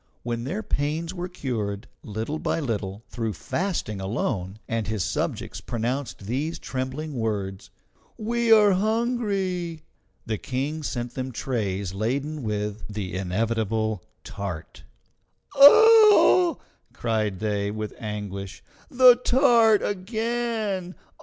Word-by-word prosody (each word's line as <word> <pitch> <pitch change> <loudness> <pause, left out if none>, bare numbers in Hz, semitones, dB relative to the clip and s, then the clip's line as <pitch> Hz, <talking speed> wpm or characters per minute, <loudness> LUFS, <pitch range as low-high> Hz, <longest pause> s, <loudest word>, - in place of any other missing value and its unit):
When 120 0 -3
their 195 +10 -3
pains 155 +3 -2
were 180 -1 -4
cured, 110 - -4
little 110 +9 -4
by - - -1
little, 105 -7 -3
through 115 -3 -3
fasting 135 - -3
alone, 95 -1 -2
and 115 -1 -2
his 105 -3 -1
subjects - - -3
pronounced 120 -1 -3
these 145 +9 -2
trembling 135 +4 -4
words, 105 -5 -3 0.5
"We 235 +1 0
are 210 -2 +7
hungry!" 195 -6 -1 0.4
the 110 -2 -2
King 140 +5 -3
sent 120 -4 -4
them 130 0 -4
trays 100 -7 -2
laden 140 +9 -2
with 105 -2 -3
the 100 -4 -5
inevitable 110 +2 -1 0.2
tart. 95 -6 -7 0.7
"Ah!" 405 +1 +8 0.4
cried 110 -4 -1
they, 100 0 -1
with 110 0 -4
anguish, 100 -3 -6 0.3
"the 250 -1 +7
tart 240 -4 +4
again! 220 -2 -2
125 Hz, 110 wpm, -25 LUFS, -, 0.7 s, Ah